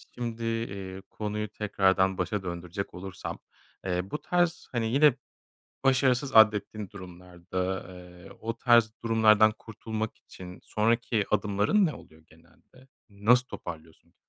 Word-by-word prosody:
şimdi, 115 -1 -4
eee, 100 -5 -4
konuyu 105 0 -4
tekrardan 95 -2 +1
başa 95 +2 -2
döndürecek 90 +2 -5
olursam, 95 +1 -7 0.5
eee, 90 +1 -2
bu 150 - -3
tarz, 175 -1 0
hani, 115 -2 -1
yine 145 0 +6 0.7
başarısız 130 0 +2
addettiğin 105 -2 +4
durumlarda, 90 -2 -9 0.3
ııı, 90 -1 -13
o 115 +1 -4
tarz 120 -3 +4
durumlardan 110 -1 +5
kurtulmak 110 0 -5
için 90 -1 -12
sonraki 115 0 +1
adımların 105 - +2
ne 155 - -2
oluyor 80 +1 -15
genelde? 85 +11 -22 0.2
Nasıl 110 +5 +3
toparlıyorsun? 80 -7 -10
105 Hz, 120 wpm, -28 LUFS, 95-115 Hz, 0.7 s, yine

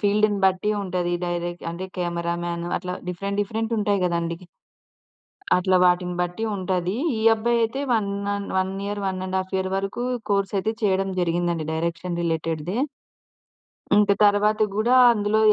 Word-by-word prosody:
ఫీల్డ్‌ని 205 0 +2
బట్టి 190 +2 +1
ఉంటది 180 -2 -2
డైరెక్ట్ 175 0 -3
అంటే 170 +2 -5
కెమెరామన్ 170 0 -2
అట్లా 180 0 -4
డిఫరెంట్ 200 +3 -2
డిఫరెంట్ 225 +2 -2
ఉంటాయి 205 -1 +1
గదండీ! 170 -1 -1 1.2
అట్లా 185 +1 +2
వాటిని 180 0 +1
బట్టి 180 +5 -3
ఉంటది. 185 0 -1 0.2
ఈ - - -2
అబ్బాయి 235 +2 +1
అయితే 265 +5 -3
1 215 -4 +1 0.2
అన్ 200 0 -4
1 190 0 0
ఇయర్, 205 0 -3
1½ 185 0 -2
ఇయర్ 190 0 -1
వరకు 195 +5 -3 0.3
కోర్సెస్ 200 0 +1
అయితే 220 +3 -1
చేయడం 195 -1 +1
జరిగిందండి 170 -2 0
డైరెక్షన్ 170 +2 -2
రిలేటెడ్‌దే. 165 +3 -2 1.2
ఇంక 205 0 +5
తరువాత 210 +1 +4
గూడా 225 +5 +2 0.2
అందులో 210 0 +1
190 Hz, 135 wpm, -24 LUFS, 175-205 Hz, 1.2 s, ఇంక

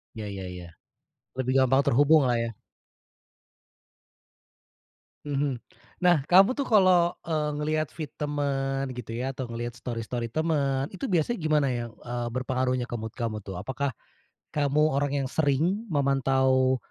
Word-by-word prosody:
Iya 110 -1 -5
iya 95 -1 -6
iya. 90 -1 -8 0.7
Lebih 130 0 0
gampang 135 +1 +4
terhubunglah 140 -1 +4
ya. 115 - -2 2.8
Mhm. 140 -3 -1 0.4
Nah, 175 -6 +4
kamu 195 - +5
tuh 280 - 0
kalau, 185 -6 +4
eee, 155 -3 -1
ngelihat 155 +1 -1
feed 155 -4 -6
teman 135 -2 -1
gitu 125 -3 -7
ya, 125 +3 -2
atau 130 -1 -4
ngelihat 120 +1 -5
story-story 115 0 -4
teman, 145 -4 0
itu 195 +8 -6
biasanya 185 - +1
gimana 155 -4 +2
ya? 120 -2 -2
Eee, 120 0 -5
berpengaruhnya 130 -1 -1
ke 120 - -3
mood 110 0 -6
kamu 115 -3 -3
tuh? 95 - -6
Apakah 130 +4 -3 0.6
kamu 150 +1 +2
orang 140 0 0
yang - - -3
sering 160 - +1
memantau, 130 -3 +2
135 Hz, 135 wpm, -27 LUFS, 125-155 Hz, 2.8 s, kamu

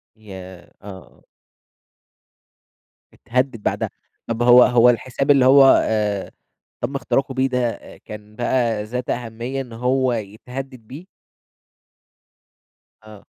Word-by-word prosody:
ياه! 95 -4 -12
آه. 95 -4 -13 1.9
اتهدد 125 -2 -2
بعدها، - - -2 0.4
طَب 115 0 -3
هو 125 0 +7
هو 125 0 +5
الحساب 130 +3 0
اللي 135 -2 +4
هو، 135 +1 +7 0.2
آآ، 105 -3 -2 0.5
تم 140 - -3
اختراقه 135 0 -1
بيه 130 0 +1
ده، 125 -2 0
آآ، - - -12
كان 105 0 -12
بقى 120 -3 -1
ذات 125 +3 -5
أهمية 120 +3 -4
إن 125 -3 -8
هو 125 +2 0
يتهدد 125 +5 -7
بيه؟ 155 +8 -10 2.0
آه. 105 -2 -15
120 Hz, 110 wpm, -20 LUFS, 110-130 Hz, 2.0 s, هو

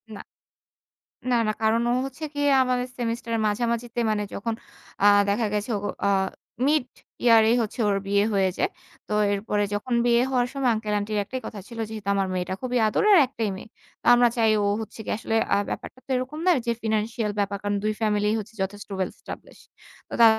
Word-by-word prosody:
না। - - -9 1.1
না, - - +4
না। - - +2
কারণ 220 +1 +3
ও - - +2
হচ্ছে 270 +4 -8
গিয়ে 290 0 +1
আমাদের 250 0 0
সেমিস্টারের 230 -1 -2
মাঝামাঝিতে 235 +2 -1
মানে 210 -1 0
যখন 230 +3 -2 0.5
আ - - +6 0.2
দেখা 215 +3 +1
গেছে 210 +3 -2
ও - - -4 0.3
আ - - +3 0.6
মিড 295 -2 +3 0.4
ইয়ারেই 230 -1 +6
হচ্ছে 225 +3 -4
ওর 200 - +2
বিয়ে 200 0 +3
হয়ে 195 -1 +3
যায়। 370 - +1 0.4
তো - - -3 0.2
এরপরে 205 +1 -1
যখন 215 +5 -2
বিয়ে 235 0 +4
হওয়ার 245 -2 +2
সময় 270 -3 +1
আঙ্কেল-আন্টির 210 -1 -2
একটাই 260 +5 -6
কথা 210 - -6
ছিল, 235 - -10
"যেহেতু 215 -2 -8
আমার 195 -1 +1
মেয়েটা 185 0 -2
খুবই 250 -1 -1
আদরের, 415 - +4
একটাই 230 -4 -2
মেয়ে। 205 - -11 0.4
আমরা 240 0 +6
চাই 225 -1 +4
ও - - +1 0.2
হচ্ছে 220 - -9
গিয়ে - - -1
আসলে" 225 0 -2 0.2
আ - - +5
ব্যাপারটা - - -6
তো - - -48
এরকম 260 +5 -3
নয়, 350 - +5
যে 235 - +1
ফিন্যান্সিয়াল 220 0 -1
ব্যাপার। 200 0 0
কারণ 205 0 0
দুই 215 0 +1
ফ্যামিলিই 210 0 +2
হচ্ছে 215 +1 -9
যথেষ্ট 205 +2 -6
ওয়েল 190 -1 -1
স্টাবলিশ। - - -10 0.5
তো - - -10
তা - - +10
225 Hz, 190 wpm, -25 LUFS, 205-245 Hz, 1.1 s, তা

